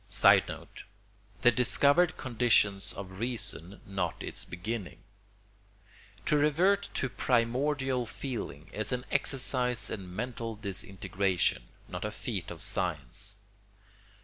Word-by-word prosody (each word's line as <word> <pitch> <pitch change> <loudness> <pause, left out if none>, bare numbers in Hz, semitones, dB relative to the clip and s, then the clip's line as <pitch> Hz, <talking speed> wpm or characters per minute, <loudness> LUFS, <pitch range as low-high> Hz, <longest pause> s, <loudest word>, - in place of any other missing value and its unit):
[Sidenote: - - +3 0.6
The 120 - +8
discovered 145 +8 +4
conditions 115 -5 +2
of 95 -1 -8
reason 105 - -3
not 95 -4 -2
its - - -5
beginning.] 100 +2 -5 1.2
To 150 - +3
revert 180 +7 +3
to 130 - +1
primordial 130 +1 +1
feeling 110 - -5
is 110 -1 -2
an 125 0 -2
exercise 125 -2 +1
in 90 -3 -6
mental 115 0 -3
disintegration, 95 - -1 0.2
not - - -5
a - - -1
feat - - -4
of - - -5
science. 80 -9 -2
115 Hz, 105 wpm, -30 LUFS, 95-130 Hz, 1.2 s, The